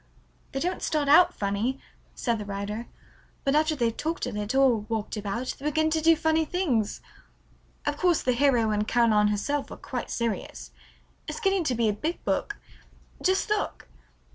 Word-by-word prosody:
"They 270 Hz, -, -2 dB
don't 360 Hz, +5 st, -2 dB
start 300 Hz, -2 st, 0 dB
out 305 Hz, +5 st, +7 dB
funny," 210 Hz, +7 st, -2 dB, 0.4 s
said 235 Hz, -3 st, -1 dB
the 210 Hz, -, -5 dB
writer, 205 Hz, +3 st, -4 dB, 0.6 s
"but 275 Hz, -, +1 dB
after 310 Hz, +1 st, +3 dB
they've 235 Hz, -4 st, 0 dB
talked 325 Hz, +2 st, -2 dB
a 250 Hz, -, -3 dB
little 210 Hz, +6 st, +1 dB
or 250 Hz, -4 st, +4 dB
walked 215 Hz, +1 st, -4 dB
about 215 Hz, +4 st, -3 dB
they 280 Hz, -, -9 dB
begin 315 Hz, +1 st, +1 dB
to 315 Hz, 0 st, +1 dB
do 330 Hz, +1 st, +6 dB
funny 320 Hz, +1 st, +2 dB
things. 290 Hz, -, -1 dB, 0.8 s
Of 295 Hz, 0 st, -1 dB
course 355 Hz, -1 st, +2 dB
the 255 Hz, -, +2 dB
hero 240 Hz, -4 st, +3 dB
and 210 Hz, 0 st, 0 dB
Caroline 220 Hz, -3 st, +4 dB
herself 270 Hz, +8 st, -1 dB
are -, -, -8 dB
quite -, -, -5 dB
serious. 230 Hz, -3 st, -3 dB, 0.6 s
It's -, -, -4 dB
getting 390 Hz, -4 st, +2 dB
to 255 Hz, -, +1 dB
be 230 Hz, -1 st, +2 dB
a 210 Hz, -, +2 dB
big 310 Hz, +11 st, -4 dB
book. -, -, -1 dB, 0.6 s
Just 375 Hz, 0 st, +2 dB
look." 425 Hz, -1 st, -2 dB
255 Hz, 175 wpm, -27 LUFS, 215-315 Hz, 0.8 s, out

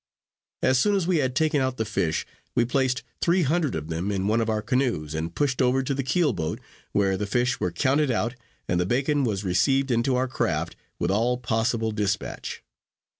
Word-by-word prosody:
As 130 Hz, 0 st, +4 dB
soon 205 Hz, +9 st, +3 dB
as 190 Hz, -4 st, +1 dB
we 180 Hz, -1 st, +2 dB
had 130 Hz, -3 st, 0 dB
taken 155 Hz, -1 st, +2 dB
out 130 Hz, -1 st, -1 dB
the 110 Hz, -, -1 dB
fish, 85 Hz, -7 st, -1 dB, 0.3 s
we 120 Hz, -, +3 dB
placed 130 Hz, +1 st, 0 dB, 0.2 s
three 175 Hz, +1 st, +3 dB
hundred 155 Hz, 0 st, +1 dB
of 80 Hz, 0 st, -5 dB
them 85 Hz, +5 st, -2 dB
in 95 Hz, -1 st, -1 dB
one 110 Hz, +3 st, +2 dB
of 115 Hz, -, -1 dB
our 110 Hz, -1 st, 0 dB
canoes, 120 Hz, -, 0 dB
and 80 Hz, +1 st, -3 dB
pushed 140 Hz, -3 st, +1 dB
over 130 Hz, +1 st, +3 dB
to 140 Hz, -, -1 dB
the 135 Hz, -, -1 dB
keel 150 Hz, +1 st, +1 dB
boat, 80 Hz, -3 st, -3 dB, 0.3 s
where 95 Hz, -1 st, +2 dB
the 105 Hz, -, -3 dB
fish 125 Hz, +4 st, +1 dB
were 90 Hz, -, 0 dB
counted 140 Hz, -, +2 dB
out, 120 Hz, 0 st, 0 dB, 0.3 s
and 90 Hz, -, +1 dB
the 90 Hz, -, 0 dB
bacon 140 Hz, +5 st, +1 dB
was 105 Hz, -5 st, -1 dB
received 135 Hz, +9 st, +2 dB
into 120 Hz, +2 st, +2 dB
our 130 Hz, +1 st, +1 dB
craft 85 Hz, -9 st, -1 dB, 0.2 s
with 90 Hz, -, 0 dB
all 120 Hz, +5 st, +2 dB
possible 115 Hz, -1 st, 0 dB
despatch. 100 Hz, -2 st, -3 dB
120 Hz, 205 wpm, -25 LUFS, 100-135 Hz, 0.3 s, As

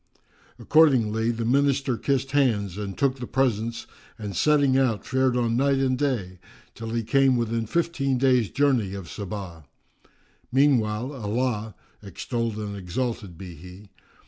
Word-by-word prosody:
Accordingly, 115 Hz, -8 st, +3 dB
the 115 Hz, -1 st, -2 dB
Minister 135 Hz, 0 st, +2 dB
kissed 135 Hz, +2 st, -1 dB
hands 110 Hz, -10 st, +1 dB
and 100 Hz, -1 st, -5 dB
took 135 Hz, -2 st, +1 dB
the 125 Hz, -, -5 dB
presents 115 Hz, -3 st, -1 dB, 0.3 s
and 105 Hz, -3 st, -6 dB
setting 145 Hz, -, +3 dB
out, 130 Hz, -6 st, +1 dB
fared 130 Hz, -1 st, +1 dB
on 115 Hz, -1 st, +1 dB
night 135 Hz, +2 st, +2 dB
and 130 Hz, -1 st, +1 dB
day, 115 Hz, -10 st, -2 dB, 0.3 s
till 115 Hz, 0 st, -7 dB
he 115 Hz, 0 st, -1 dB
came 135 Hz, +3 st, +3 dB
within 115 Hz, -1 st, -1 dB
fifteen 145 Hz, -4 st, 0 dB
days' 125 Hz, -4 st, +3 dB
journey 125 Hz, -9 st, +1 dB
of 95 Hz, -4 st, -8 dB
Saba. 95 Hz, -6 st, -7 dB, 0.9 s
Meanwhile 125 Hz, -2 st, +2 dB
Allah 110 Hz, -2 st, -2 dB, 0.3 s
(extolled 115 Hz, +3 st, -4 dB
and 105 Hz, -1 st, -5 dB
exalted 100 Hz, 0 st, -4 dB
be 90 Hz, 0 st, -9 dB
He!) 90 Hz, +5 st, -13 dB
115 Hz, 140 wpm, -25 LUFS, 105-135 Hz, 0.9 s, Accordingly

